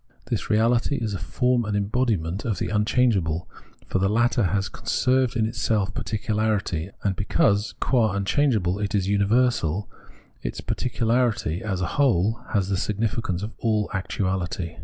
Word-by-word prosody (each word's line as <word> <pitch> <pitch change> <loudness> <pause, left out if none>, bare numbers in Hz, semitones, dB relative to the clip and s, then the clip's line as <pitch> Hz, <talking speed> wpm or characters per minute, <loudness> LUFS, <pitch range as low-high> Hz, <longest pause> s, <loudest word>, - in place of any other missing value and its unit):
This - - -1
reahty 115 +5 +2
is 110 -3 -2
a 95 - -3
form 125 +3 +1
and 105 -2 -1
embodiment 100 -4 0
of 110 -6 -1
the - - -2
unchangeable, 105 -6 +1 0.4
for 95 - -1
the 95 +1 +2
latter 120 +1 +2
has 95 +2 0
conserved 130 +4 0
in 110 -2 +2
itself 105 -2 0
particularity; 105 -6 -1
and 100 -2 +1
because, 100 +1 +1
qua 115 -6 +2
unchangeable, 100 -2 +1
it 105 0 -1
is 100 -3 +1
a - - 0
imiversal, 100 -3 +2 0.6
its - - -4
particu 125 -2 -2
larity 115 -7 +1
as 95 -4 -2
a - - +1 0.2
whole 110 -3 +2
has 100 -4 +2
the 95 - +1
significance 105 -2 -1
of 105 - -4
all 110 -2 +1
actuahty. 95 -3 -2
105 Hz, 155 wpm, -24 LUFS, 95-115 Hz, 0.6 s, reahty